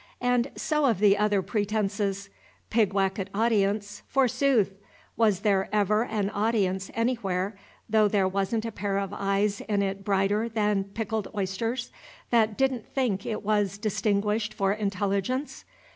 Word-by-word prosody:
And 245 +1 +2
so 300 -2 0
of 230 -6 +2
the 200 0 +5
other 205 -2 +1
pretences. 200 -2 -1 0.4
"Pigwacket 195 -3 +1
audience," 205 -2 +1
forsooth! 255 -5 +2 0.4
Was 210 -5 +2
there 200 -3 +2
ever 210 +2 +2
an 210 -4 -1
audience 200 -3 0
anywhere, 205 -5 -1 0.3
though 215 -1 +4
there 200 -2 +2
wasn't 195 +4 -1
a 230 - -3
pair 200 -2 -2
of 200 0 -2
eyes 200 +1 0
in 200 -1 +2
it 195 0 -3
brighter 205 +3 +1
than 210 -3 +1
pickled 220 +1 -3
oysters, 225 +6 -2 0.4
that 220 -3 +3
did 270 0 +3
n't 240 -4 -7
think 225 -8 -1
it 215 -1 -3
was 205 -2 +1
"distinguished 210 +1 0
for 195 0 +1
intelligence"? 205 +5 -2
210 Hz, 140 wpm, -27 LUFS, 195-225 Hz, 0.4 s, the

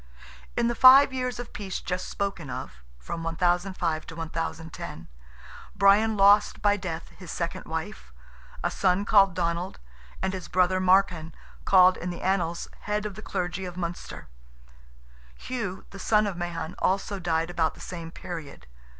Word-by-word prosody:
In 235 - +2
the 240 - +1
five 265 +3 +8
years 250 -1 -2
of 245 -1 -8
peace 195 -3 -4
just 180 +1 -4
spoken 195 -7 -3
of 125 - -7 0.2
(from 60 - -6
1005 175 0 0
to 165 - -8
1010), 160 - -5 0.7
Brian 210 +3 +4
lost 200 +1 +5
by 205 0 +3
death 170 -4 -5
his - - -13
second - - -4
wife, 65 -1 -6 0.5
a - - 0
son 190 +2 +1
called 195 -4 +5
Donald, 170 +1 -2 0.4
and 190 0 -1
his 185 -2 -5
brother 185 0 +2
Marcan, 180 -4 +3 0.3
called 185 -1 +6
in 180 - -4
the 175 - -6
annals 175 -3 0
"head 210 0 -2
of 210 - -4
the 210 - -10
clergy 180 -2 -3
of 180 -1 -7
Munster;" 175 -1 -6 1.1
Hugh, 200 - -5
the 195 - -10
son 215 +2 +3
of 200 -3 -3
Mahon, 170 -1 -4
also 195 +1 0
died 165 -1 0
about 165 -2 0
the - - -16
same 170 -2 -7
period. 165 - -8
180 Hz, 155 wpm, -27 LUFS, 165-200 Hz, 1.1 s, five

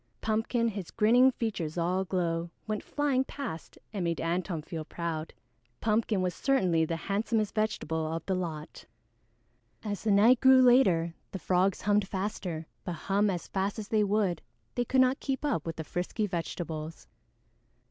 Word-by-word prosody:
Pumpkin, 225 +2 0
his 200 -5 -6
grinning 240 +4 +5
features 200 -10 -3
all 175 +2 +1
aglow, 175 -3 -1 0.2
went 215 -1 -2
flying 285 -3 +1
past 260 - -7 0.2
and 195 -4 -2
made 170 -1 -1
Antone 170 -1 -2
feel 160 0 -5
proud. 165 -1 -4 0.5
Pumpkin 215 -3 +1
was 180 -1 0
certainly 180 -10 +2
the 165 - -2
handsomest 210 +4 -1
vegetable 160 -7 -1
of 165 0 -4
the 190 - 0
lot. 165 -4 -5 1.0
As 205 -2 -3
the 220 - 0
night 220 +5 +6
grew 260 -1 +7
later, 190 -10 +4 0.2
the - - -4
frogs 185 +1 +1
hummed 205 -1 +2
faster, 185 -4 -3 0.2
but 175 - -3
hum 200 +5 +1
as 180 -3 -3
fast 195 +2 -2
as 210 -2 -6
they 215 -1 +3
would, 200 -4 +1 0.3
they 245 - 0
could 260 +2 +3
not 255 +2 +3
keep 270 +1 -2
up 170 - -1
with 165 - -3
the 160 - -5
frisky 180 +7 -2
vegetables. 165 -3 -5
195 Hz, 160 wpm, -29 LUFS, 170-220 Hz, 1.0 s, grew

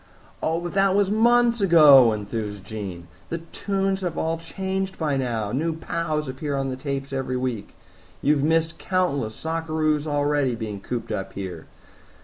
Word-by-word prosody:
"Oh, 165 +1 0
but 175 0 -5
that 195 -1 +3
was 200 -1 +2
months 235 +1 +4
ago," 150 - +8
enthused 105 -1 -4
Jean. 95 -5 -6 0.2
"The 165 - -2
tunes 195 +3 -2
have 180 -2 -3
all 160 0 -1
changed 190 +3 -3
by 150 -4 0
now. 115 -6 -1
New 160 +6 -1
pows 155 -2 -2
appear 140 +2 -3
on 135 0 -1
the 130 - -3
tapes 135 +1 -4
every 130 -1 -2
week. 125 -5 -4 0.4
You 145 - +3
have 140 -2 0
missed 160 +1 +1
countless 145 - 0
sockeroos 155 -1 -1
already, 145 -3 +1
being 110 -3 -5
cooped 120 +1 -4
up 95 -2 -4
here. 95 -5 -6
150 Hz, 160 wpm, -24 LUFS, 120-170 Hz, 0.4 s, ago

